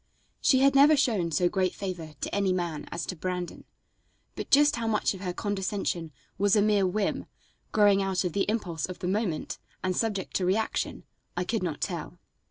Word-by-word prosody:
She 260 -1 +4
had 275 0 +5
never 290 +2 +7
shown 220 -11 +2
so 170 +3 +2
great 185 0 0
favor 175 -5 -5
to - - -3
any 200 -2 +2
man 170 -4 -3
as 170 0 -3
to 185 - -4
Brandon, 180 +1 -4 0.7
but - - -6
just 290 -1 +5
how 230 -1 -2
much 215 -2 +1
of 190 - -9
her 180 -2 -2
condescension 190 -4 -2 0.3
was 205 +1 +4
a 210 - +5
mere 205 -2 +3
whim, 200 +2 -1 0.4
growing 205 -2 +5
out 190 -1 0
of 180 -3 -2
the 200 - 0
impulse 180 -8 -2
of 185 - -7
the 180 - -4
moment, 190 -4 -1 0.2
and 185 -1 0
subject 205 -4 -1
to 190 - -2
reaction, 220 +4 -1 0.3
I 180 - +1
could 220 +4 -1
not 165 -5 -3
tell. - - -4
195 Hz, 190 wpm, -28 LUFS, 180-215 Hz, 0.7 s, never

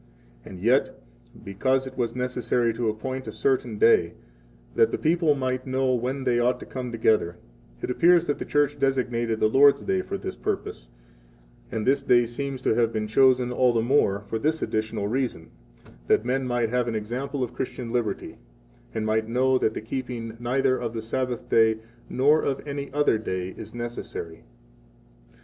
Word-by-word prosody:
And 95 - -10
60 90 - -8
yet, 130 +4 +2 0.4
because 130 +7 0
it 130 0 -8
was 120 -2 -2
necessary 125 -2 0
to 115 0 -1
appoint 130 +5 -4
a - - -4
certain 125 -5 0
day, 85 -6 +4 0.6
that - - +4
the - - -2
people 160 -2 +2
might 130 -1 -2
know 130 0 +1
when 130 +3 -2
they 125 -2 +2
ought 125 +1 +1
to - - -7
come 125 -2 -5
together, 110 -6 +1 0.5
it - - -1
appears 170 +5 +4
that 145 - -2
the - - -4
Church 145 0 +1
designated 120 -4 0
the - - +4
Lord's 140 +1 +5
Day 95 -2 0
for - - -5
this - - -6
purpose; - - -4 0.8
and 110 -1 -2
this 140 +1 +3
day 120 -3 +4
seems 130 +2 -5
to - - +3
have 115 0 +2
been 110 -1 -2
chosen 125 +2 +3
all 125 0 +3
the 115 -1 +1
more 115 -6 +2
for 110 +2 -4
this 155 +5 0
additional 110 -2 -2
reason, 120 -8 -2 0.6
that 110 - +3
men 130 +1 0
might 120 -2 0
have 125 0 0
an 115 - -2
example 125 +6 -3
of 125 -1 -4
Christian 125 -2 -5
liberty, 115 -5 -3 0.6
and 110 - -1
might 110 0 0
know 130 +2 +2
that 110 - 0
the - - -4
keeping 115 -1 -5
neither 130 +2 +1
of 115 -2 -3
the 115 - -3
Sabbath 125 +1 -2 0.7
nor 145 +4 +3
of 140 +1 -3
any 140 0 -5
other 145 -6 +2
day 95 -4 -3
is 110 - -10
necessary. 120 -8 -6
125 Hz, 180 wpm, -25 LUFS, 110-130 Hz, 0.8 s, Lord's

